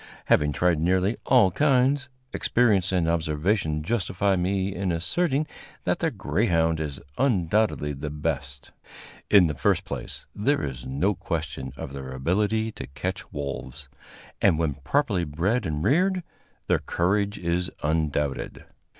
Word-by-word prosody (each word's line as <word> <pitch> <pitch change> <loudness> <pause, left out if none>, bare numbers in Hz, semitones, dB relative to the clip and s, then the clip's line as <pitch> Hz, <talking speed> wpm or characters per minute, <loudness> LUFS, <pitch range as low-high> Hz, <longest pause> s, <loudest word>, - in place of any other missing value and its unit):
Having 75 -1 +3
tried 85 +1 +2
nearly 95 +6 +2
all 120 -8 +5
kinds, 135 +2 +2 0.2
experience 105 -6 +2
and 90 -3 +1
observation 80 0 0
justify 100 -1 0
me 95 +2 0
in 95 -1 -1
asserting 140 - 0 0.4
that - - 0
the - - +1
greyhound 80 -1 +1
is 75 -3 -4 0.2
undoubtedly 105 - +1
the 70 +2 -5
best. 75 -2 -4 0.6
In 100 -4 +7
the 80 - 0
first 70 - +1
place, - - -5
there 140 +8 +1
is 65 -3 -5
no 75 +11 +1
question 75 -8 -4
of 65 - -6
their 65 -1 -6
ability 105 +11 0
to - - -8
catch 90 +8 -5
wolves, 70 0 -6 0.5
and, 80 - +4
when 80 -3 0
properly 95 - 0
bred 85 +11 0
and 75 -1 -2
reared, 185 +5 +2 0.4
their - - +2
courage 100 +4 0
is 90 +1 -1
undoubted. 75 -2 -1
85 Hz, 135 wpm, -26 LUFS, 75-105 Hz, 0.6 s, In